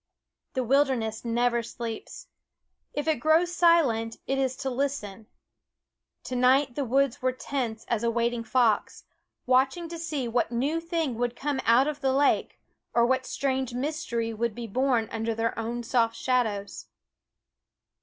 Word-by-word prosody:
The 260 - 0
wilderness 250 -4 +1
never 235 0 +1
sleeps. 230 - -7 0.7
If 290 +1 -3
it 315 - +2
grow 315 +3 +4
silent, 330 -11 +2
it 270 0 -1
is 260 -1 0
to 270 0 -3
listen. 240 -6 -3 1.0
To 255 - -5
night 255 +2 +3
the 285 - -2
woods 270 +1 +1
were 255 0 +2
tense 250 -4 -4
as 235 -3 0
a 235 - +2
waiting 235 0 0
fox, 230 -3 +1 0.4
watching 265 +7 +2
to 335 0 -6
see 300 -6 -3
what 235 +1 0
new 275 +7 0
thing 330 -7 -2
would 245 0 -1
come 280 0 -2
out 235 +4 +5
of 300 -1 -4
the 265 -1 +2
lake, 280 +1 +1 0.3
what 255 +2 +2
strange 265 -3 -1
mystery 250 -5 -2
would 225 0 -2
be 240 - -5
born 245 0 +1
under 225 0 -2
their 230 +1 -1
own 235 +2 -3
soft 230 -1 +1
shadows. 220 -7 -1
250 Hz, 150 wpm, -27 LUFS, 230-275 Hz, 1.0 s, out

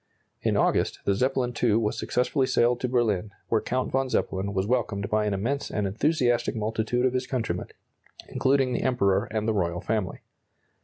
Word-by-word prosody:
In - - +1
August, - - +2
the 100 - +3
Zeppelin 125 +3 0
II 115 -4 +4
was 110 -2 +1
successfully 130 +2 0
sailed 120 0 +2
to 125 - -2
Berlin, 110 -5 +1 0.2
where 110 - +2
Count 130 +1 -2
von 135 0 0
Zeppelin 95 -4 -1
was 95 -1 0
welcomed 105 -4 -1
by 105 0 +2
an 105 - 0
immense 130 +9 -2
and 105 -2 -1
enthusiastic 120 +3 +1
multitude 110 +3 0
of 130 - +2
his 130 0 -1
countrymen, 125 -4 -2 0.6
including 135 -1 +1
the - - -1
Emperor 100 -7 +2
and 110 0 -3
the 110 - +2
royal 90 -4 0
family. 105 -1 -2
115 Hz, 175 wpm, -26 LUFS, 105-125 Hz, 0.6 s, II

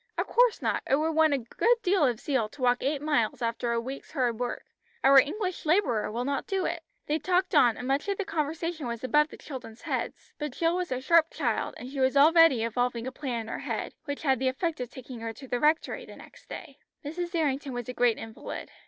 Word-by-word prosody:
"Of - - +1
course - - +3
not. - - +1
It 270 - +5
would 310 +3 +1
want 315 -2 +4
a - - +1
good 270 - +2
deal 370 -3 +3
of 240 -3 -1
zeal 260 -7 0
to 285 +4 -14
walk 245 0 +3
eight 280 +1 -1
miles 245 -8 +1
after 235 +1 -1
a 235 - +1
week's 265 +6 -7
hard 245 -6 0
work. 245 -1 -3 0.4
Our 275 0 +8
English 370 +6 -1
labourer 300 - +2
will 240 +3 -2
not 280 0 -2
do 385 -2 0
it." 335 0 -2 0.2
They 305 +2 0
talked 365 +1 +1
on, 235 -2 +5
and 250 - -5
much 275 +6 0
of 400 -1 -1
the 400 - -2
conversation 325 -3 -2
was 235 0 -5
above 300 +3 +3
the - - -12
children's 245 -5 -9
heads, - - -4
but 300 -4 -3
Jill 335 +3 +1
was 360 -3 -2
a 255 0 -1
sharp 330 +3 +4
child, 240 -8 -2
and 245 - -8
she 275 - -5
was 260 +1 +3
already 315 -4 +6
evolving 235 +1 -1
a 260 - -3
plan 255 -4 -3
in 220 - -9
her - - -4
head, - - -4
which 285 0 -5
had 265 -5 +2
the 260 - 0
effect 310 +5 -1
of 250 -2 -4
taking 255 -1 -9
her 225 0 -4
to 265 +4 -12
the 245 -1 -1
Rectory 305 +3 +1
the - - -12
next - - -16
day. 280 0 -9 0.3
Mrs. 345 +4 -4
Errington 285 -4 0
was 245 -2 -4
a 250 - -4
great 245 -2 +2
invalid. 225 0 -7
275 Hz, 240 wpm, -28 LUFS, 245-320 Hz, 0.4 s, Our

